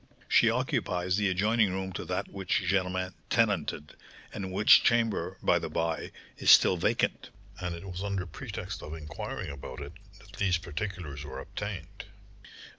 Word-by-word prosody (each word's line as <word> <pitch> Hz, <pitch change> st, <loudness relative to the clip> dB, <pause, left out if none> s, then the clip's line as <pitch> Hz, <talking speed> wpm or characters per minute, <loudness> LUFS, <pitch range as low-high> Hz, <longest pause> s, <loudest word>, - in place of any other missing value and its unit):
She -, -, +5 dB
occupies 90 Hz, 0 st, 0 dB
the 105 Hz, -1 st, +2 dB
adjoining 105 Hz, +3 st, +2 dB
room 95 Hz, 0 st, -3 dB
to -, -, -4 dB
that -, -, -2 dB
which 95 Hz, -1 st, -1 dB
Germain 95 Hz, -1 st, 0 dB, 0.2 s
tenanted, 75 Hz, 0 st, 0 dB, 0.4 s
and 95 Hz, -1 st, -4 dB
which 105 Hz, +3 st, +7 dB
chamber, 115 Hz, -3 st, +1 dB
by -, -, +4 dB
the -, -, -4 dB
by, 80 Hz, -2 st, -2 dB, 0.3 s
is -, -, +1 dB
still -, -, +8 dB
vacant; 85 Hz, -, 0 dB, 0.3 s
and 90 Hz, -1 st, -3 dB
it 85 Hz, -, -9 dB
was 90 Hz, 0 st, -5 dB
under 100 Hz, -2 st, -2 dB
pretext 80 Hz, -, -6 dB
of 75 Hz, -, -7 dB
inquiring 75 Hz, -2 st, -6 dB
about 65 Hz, -1 st, -8 dB
it 70 Hz, +2 st, -7 dB, 0.2 s
that 100 Hz, -1 st, -15 dB
these 95 Hz, -3 st, +3 dB
particulars 85 Hz, -3 st, -5 dB
were 75 Hz, -, -7 dB
obtained." 100 Hz, -6 st, -6 dB
95 Hz, 155 wpm, -29 LUFS, 80-100 Hz, 0.4 s, still